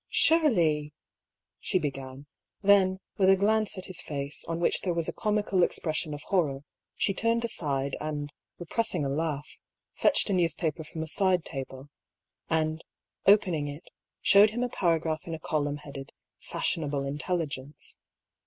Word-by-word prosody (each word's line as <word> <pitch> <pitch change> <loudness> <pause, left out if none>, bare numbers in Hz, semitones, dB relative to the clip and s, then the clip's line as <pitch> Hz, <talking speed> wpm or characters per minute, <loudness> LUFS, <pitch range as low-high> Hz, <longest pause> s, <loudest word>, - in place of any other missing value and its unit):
" - - -63
Surely 170 - +3 0.3
" - - -63 0.3
she 185 - +1
began; 135 -3 -5 0.4
then, 190 -2 +5 0.2
with 190 -1 +4
a 195 - +7
glance 215 +1 +2
at 185 - -6
his 185 - -2
face, 140 0 -5
on 165 0 -3
which 170 - +1
there 180 -3 -1
was 170 -1 -1
a - - -2
comical 210 -3 +1
expression 155 -2 0
of 145 - -10
horror, 150 -8 0 0.3
she 195 - +1
turned 230 +3 +1
aside 140 -10 -2
and, 145 -1 -4 0.2
repressing 175 -2 -1
a - - -1
laugh, 150 0 -2 0.5
fetched - - +4
a - - +2
newspaper 165 -3 0
from 160 +1 -6
a - - -6
side 185 0 +2
table, 135 -1 -7 0.6
and, 160 0 0 0.4
opening 180 -7 +4
it, 145 +4 -9 0.3
showed 205 +2 +7
him 240 +3 -2
a 250 - -1
paragraph 165 -6 0
in 165 - -3
a - - -9
column 145 -2 -1
headed 140 -2 -9 0.4
'^Fashionable 145 -3 -1
Intelligence." 145 -1 -4
160 Hz, 155 wpm, -28 LUFS, 145-190 Hz, 0.6 s, a